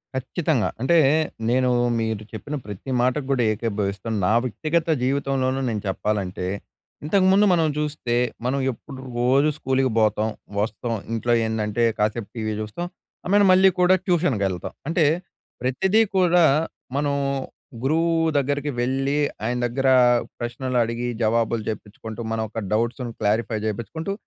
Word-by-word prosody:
ఖచ్చితంగా. 135 Hz, 0 st, 0 dB
అంటే, 170 Hz, +6 st, +4 dB, 0.5 s
నేను 125 Hz, +1 st, +2 dB, 0.3 s
మీరు 110 Hz, -2 st, -2 dB
చెప్పిన 145 Hz, +7 st, -5 dB
ప్రతి 105 Hz, +6 st, -7 dB
మాటకు 130 Hz, +3 st, +1 dB
కూడా 125 Hz, -3 st, +2 dB
ఏకీభవిస్తాను. 105 Hz, -1 st, -2 dB
నా 110 Hz, -, +3 dB
వ్యక్తిగత 155 Hz, -, -1 dB, 0.2 s
జీవితంలోనూ 135 Hz, -1 st, 0 dB
నేను 105 Hz, -3 st, -2 dB
చెప్పాలంటే, 95 Hz, -2 st, -2 dB, 0.6 s
ఇంతకుముందు 190 Hz, +4 st, +4 dB
మనం 165 Hz, -2 st, +3 dB
చూస్తే 150 Hz, -5 st, -2 dB, 0.3 s
మనం 135 Hz, +2 st, 0 dB
ఎప్పుడు 130 Hz, +3 st, -11 dB, 0.2 s
రోజు 130 Hz, +5 st, +3 dB
స్కూల్‌కి 130 Hz, -2 st, +1 dB
బోతాం, 110 Hz, 0 st, +2 dB, 0.3 s
వస్తాం. 110 Hz, +3 st, -2 dB, 0.2 s
ఇంట్లో 120 Hz, +1 st, +1 dB
ఏందంటే, 110 Hz, +1 st, 0 dB
కాసేపు 105 Hz, +1 st, -1 dB
టీవీ 110 Hz, -1 st, -2 dB
చూస్తాం. 110 Hz, +12 st, -5 dB, 0.4 s
ఐ -, -, -4 dB
మీన్ 205 Hz, 0 st, +6 dB
మళ్ళీ 190 Hz, +1 st, +6 dB
కూడా 180 Hz, +1 st, +5 dB
ట్యూషన్‌కెళ్తాం. 110 Hz, -, 0 dB, 0.2 s
అంటే, 165 Hz, -1 st, +3 dB, 0.6 s
ప్రతిదీ 185 Hz, -, +2 dB, 0.2 s
కూడా, 180 Hz, -1 st, +5 dB, 0.5 s
మనం 145 Hz, 0 st, 0 dB, 0.7 s
గురువు 165 Hz, +4 st, +2 dB, 0.2 s
దగ్గరికి 145 Hz, +1 st, 0 dB
వెళ్లి, 135 Hz, +3 st, 0 dB, 0.2 s
ఆయన 120 Hz, +2 st, -1 dB
దగ్గర 135 Hz, +3 st, -1 dB, 0.5 s
ప్రశ్నలు 125 Hz, +2 st, -3 dB
అడిగి 115 Hz, +1 st, -3 dB, 0.2 s
జవాబులు 115 Hz, 0 st, +1 dB
చెప్పించుకుంటూ, 110 Hz, +1 st, -7 dB
మన 110 Hz, -, -2 dB
యొక్క 115 Hz, -, -5 dB
డౌట్స్‌ను 120 Hz, +2 st, -1 dB
క్లారిఫై 110 Hz, +1 st, +1 dB
చేపించుకుంటూ 160 Hz, -, -4 dB
125 Hz, 125 wpm, -23 LUFS, 110-145 Hz, 0.7 s, మీన్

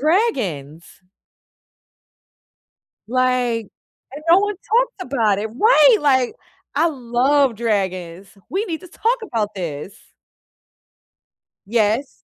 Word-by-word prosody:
dragons! 215 Hz, -, 0 dB, 2.2 s
Like 245 Hz, -3 st, 0 dB, 0.4 s
and 295 Hz, +3 st, -9 dB
no 350 Hz, +3 st, +7 dB
one 410 Hz, 0 st, -1 dB
talked 465 Hz, +2 st, -1 dB
about 210 Hz, -5 st, +2 dB
it 220 Hz, -, -2 dB
Right, 455 Hz, -, +5 dB
like, 260 Hz, -4 st, +2 dB, 0.4 s
I 320 Hz, +4 st, +3 dB
love 260 Hz, -1 st, +1 dB
dragons. 190 Hz, -5 st, -2 dB, 0.2 s
We 395 Hz, +4 st, -1 dB
need 330 Hz, -3 st, -5 dB
to 365 Hz, -, -12 dB
talk 465 Hz, +7 st, 0 dB
about 215 Hz, -, -2 dB
this. 170 Hz, 0 st, -6 dB, 1.7 s
Yes. 225 Hz, +4 st, 0 dB
250 Hz, 95 wpm, -20 LUFS, 205-335 Hz, 2.2 s, no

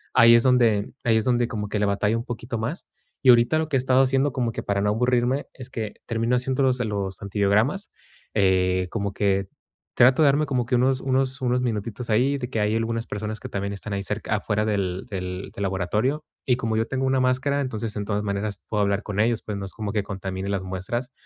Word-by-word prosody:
ahí 115 Hz, -2 st, +8 dB
es 120 Hz, -, +6 dB
donde 120 Hz, -5 st, +3 dB
ahí 115 Hz, -2 st, +3 dB
es 110 Hz, -, 0 dB
donde 120 Hz, -1 st, +2 dB
como 105 Hz, -3 st, -4 dB
que 105 Hz, -, -1 dB
le 105 Hz, -, +2 dB
batallo 105 Hz, +2 st, +1 dB
un 115 Hz, -, -4 dB
poquito 120 Hz, -1 st, -5 dB
más. 115 Hz, +11 st, -4 dB, 0.4 s
Y 130 Hz, -, +5 dB
ahorita 120 Hz, +5 st, +5 dB
lo 160 Hz, -, -1 dB
que 150 Hz, -, -2 dB
he -, -, +2 dB
estado 130 Hz, 0 st, +4 dB
haciendo 135 Hz, +2 st, +2 dB
como 120 Hz, -2 st, -1 dB
que -, -, -5 dB
para 100 Hz, 0 st, 0 dB
no 105 Hz, -, +2 dB
aburrirme 125 Hz, +4 st, +1 dB
es 130 Hz, -1 st, -10 dB
que 110 Hz, -5 st, -5 dB
termino 115 Hz, +1 st, +1 dB
haciéndolos, 130 Hz, 0 st, +1 dB
eh, 125 Hz, -, 0 dB
los 100 Hz, -3 st, -3 dB
antibiogramas 105 Hz, -, +1 dB, 0.4 s
eh 95 Hz, -2 st, +2 dB
como 100 Hz, -3 st, -2 dB
que 100 Hz, -1 st, +1 dB, 0.5 s
trato 125 Hz, +5 st, +5 dB
de -, -, +6 dB
darme 145 Hz, +2 st, +3 dB
como 130 Hz, -4 st, -1 dB
que 125 Hz, +2 st, 0 dB
unos 130 Hz, +1 st, +2 dB
unos 135 Hz, +1 st, 0 dB
unos 125 Hz, 0 st, +1 dB
minutitos 115 Hz, 0 st, -3 dB
ahí 130 Hz, +6 st, +2 dB
de 125 Hz, -3 st, -5 dB
que 115 Hz, -, -2 dB
hay 105 Hz, +1 st, +1 dB
algunas 115 Hz, 0 st, -1 dB
personas 105 Hz, +1 st, -4 dB
que -, -, -7 dB
también 100 Hz, 0 st, -3 dB
están 100 Hz, +1 st, -6 dB
ahí 100 Hz, 0 st, -2 dB
cerc 105 Hz, +2 st, -4 dB
afuera 105 Hz, 0 st, 0 dB
del 95 Hz, -3 st, -1 dB
del 90 Hz, -1 st, -5 dB
del 100 Hz, -, -4 dB
laboratorio. 105 Hz, -, 0 dB, 0.2 s
Y 125 Hz, -, +3 dB
como 115 Hz, -3 st, -1 dB
yo 115 Hz, +1 st, 0 dB
tengo 135 Hz, +2 st, -1 dB
una 130 Hz, 0 st, +2 dB
máscara, 130 Hz, +3 st, +1 dB
entonces, 115 Hz, -5 st, -3 dB
en 105 Hz, -, -3 dB
todas 105 Hz, 0 st, -1 dB
maneras 100 Hz, 0 st, -3 dB
puedo 105 Hz, -1 st, 0 dB
hablar 100 Hz, +1 st, +1 dB
con 105 Hz, -1 st, -4 dB
ellos, 115 Hz, +1 st, +2 dB
pues, 105 Hz, -2 st, -4 dB
no 100 Hz, -, -5 dB
es 95 Hz, -, -8 dB
como 105 Hz, -2 st, -4 dB
que 105 Hz, -2 st, 0 dB
contamine 95 Hz, -1 st, -5 dB
las 100 Hz, -1 st, -1 dB
muestras. 95 Hz, +7 st, -4 dB
110 Hz, 230 wpm, -24 LUFS, 100-125 Hz, 0.5 s, ahí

